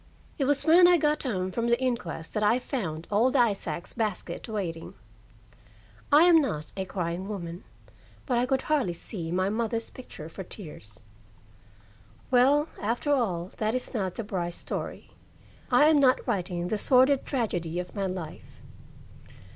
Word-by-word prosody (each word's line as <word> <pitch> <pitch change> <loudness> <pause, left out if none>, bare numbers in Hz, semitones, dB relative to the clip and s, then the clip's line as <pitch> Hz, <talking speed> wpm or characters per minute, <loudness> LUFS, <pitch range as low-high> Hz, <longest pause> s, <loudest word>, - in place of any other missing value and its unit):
It 275 - +2
was 285 +1 +1
when 345 +2 +7
I 355 0 +6
got 300 -1 +1
home 190 -8 -2
from 235 +4 -1
the 235 0 +3
inquest 235 -11 -3
that 215 - -1
I 210 +3 +4
found 180 - -4
old 235 +6 +3
Isaac's 200 - 0
basket 220 0 -3
waiting. 175 -7 -4 1.2
I 295 +3 +8
am 340 -2 +7
not 155 - -3
a 190 -1 -3
crying 180 0 -3
woman, 175 -4 -6 0.6
but 245 -3 +1
I 250 - +1
could 265 0 0
hardly 280 - +1
see 170 -1 -4
my 185 +2 +1
mother's 225 +1 -2
picture 200 -11 -10
for 180 +4 -8
tears. 150 - -10 1.3
Well, 275 +5 +4
after 235 +7 0
all, 185 -9 -1
that 215 +2 0
is 255 - -4
not 190 -6 -2
the 230 - -4
Brice 175 -4 -3
story. - - -6 0.6
I 295 - +5
am 305 -1 +5
not 260 -2 +3
writing 180 -2 -2
the 215 - -1
sordid 260 +3 +4
tragedy 175 - -2
of 180 0 -4
my 200 -1 -1
life. 180 -4 -7
215 Hz, 155 wpm, -27 LUFS, 175-255 Hz, 1.3 s, I